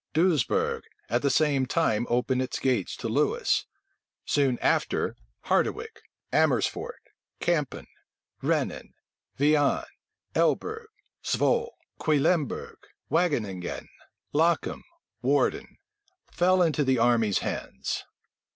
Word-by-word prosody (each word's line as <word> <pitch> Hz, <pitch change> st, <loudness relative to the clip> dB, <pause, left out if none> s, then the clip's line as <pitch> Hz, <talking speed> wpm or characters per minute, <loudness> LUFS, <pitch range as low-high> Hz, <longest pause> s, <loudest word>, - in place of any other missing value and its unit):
Doesbourg 160 Hz, -5 st, +2 dB, 0.3 s
at 120 Hz, -, +1 dB
the 140 Hz, -, +2 dB
same 140 Hz, -3 st, +2 dB
time 120 Hz, -7 st, +1 dB
opened 125 Hz, +2 st, +1 dB
its 130 Hz, -, -2 dB
gates 125 Hz, -8 st, 0 dB
to -, -, -4 dB
Lewis: -, -, +1 dB, 0.6 s
soon 135 Hz, -4 st, +2 dB
after, -, -, +1 dB, 0.3 s
Harderwic, 450 Hz, 0 st, 0 dB, 0.3 s
Amersfort, 475 Hz, 0 st, +1 dB, 0.4 s
Campen, 155 Hz, -6 st, -1 dB, 0.6 s
Rhenen, -, -, -1 dB, 0.4 s
Viane, 145 Hz, 0 st, +3 dB, 0.5 s
Elbe 445 Hz, +1 st, 0 dB, 0.3 s
g, -, -, -1 dB
Zwol. 470 Hz, 0 st, +2 dB, 0.3 s
Cuilemberg, 155 Hz, 0 st, +1 dB, 0.3 s
Wageninguen, 115 Hz, -, -1 dB, 0.4 s
Lochem, 165 Hz, +3 st, +1 dB, 0.4 s
Woerden, -, -, +1 dB, 0.5 s
fe 180 Hz, 0 st, +3 dB
into 150 Hz, -2 st, +1 dB
the 130 Hz, -1 st, +2 dB
enemy's 115 Hz, -3 st, +3 dB
hands. -, -, -3 dB
145 Hz, 95 wpm, -27 LUFS, 125-170 Hz, 0.6 s, Viane